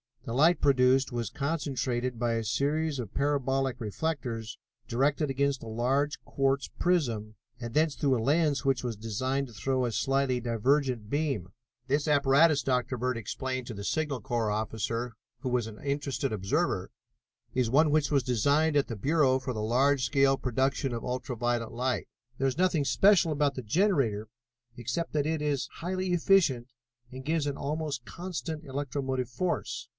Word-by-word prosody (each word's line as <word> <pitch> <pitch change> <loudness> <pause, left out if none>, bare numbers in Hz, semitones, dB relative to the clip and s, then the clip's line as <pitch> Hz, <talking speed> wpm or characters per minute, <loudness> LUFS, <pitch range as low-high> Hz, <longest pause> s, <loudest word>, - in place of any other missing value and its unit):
The 115 - -4
light 160 +7 +4
produced 130 -1 +4
was 120 -3 -2
concentrated 130 -4 -2
by 120 0 0
a 115 0 -1
series 140 +6 0
of 115 -5 -6
parabolic 135 -2 0
reflectors, 115 -1 -3 0.3
directed 140 +5 +1
against 140 0 0
a - - -8
large 130 +6 0
quartz 135 0 0
prism, 120 -12 0 0.2
and 120 -1 -6
thence 155 0 +2
through 135 -3 +2
a - - -2
lens 150 +1 +2
which 135 -3 +1
was 120 -3 -2
designed 130 +6 -2
to 120 - -14
throw 130 +5 0
a 120 - -1
slightly 135 +2 +1
divergent 120 0 0
beam. 140 - -1 0.4
"This 145 +3 +1
apparatus," 145 +1 +4
Dr. 125 -1 0
Bird 125 0 -1
explained 130 +2 -4
to 120 - -5
the 100 -1 -7
Signal 145 +2 -1
Corps 120 -4 -1
officer, 110 +2 -2 0.3
who 130 - -3
was 125 -3 0
an 105 -1 -10
interested 140 -1 -1
observer, 95 -3 -1 0.6
"is 125 -3 +1
one 150 +4 +4
which 155 -1 +2
was 140 -3 +2
designed 145 +6 +2
at 140 - +2
the 115 - -4
Bureau 135 +3 +3
for 130 -1 -4
the 110 - -3
large 130 +5 +2
scale 135 -1 +3
production 130 +1 0
of 115 - -4
ultra 125 0 -3
violet 120 0 -1
light. 125 +2 -1 0.3
There 135 - +1
is 135 - -2
nothing 175 -5 +2
special 190 0 +4
about 145 -2 +1
the 130 - -5
generator 115 - +1 0.5
except 125 +8 -3
that 150 -1 +1
it 160 -1 -1
is 145 -3 0
highly 185 +2 -3
efficient 165 -9 +3 0.4
and 130 +1 -8
gives 155 -1 0
an 140 - -2
almost 145 -3 -3
constant 170 -3 -5
electromotive 135 -3 -3
force. 170 +9 -2
135 Hz, 165 wpm, -29 LUFS, 120-145 Hz, 0.6 s, light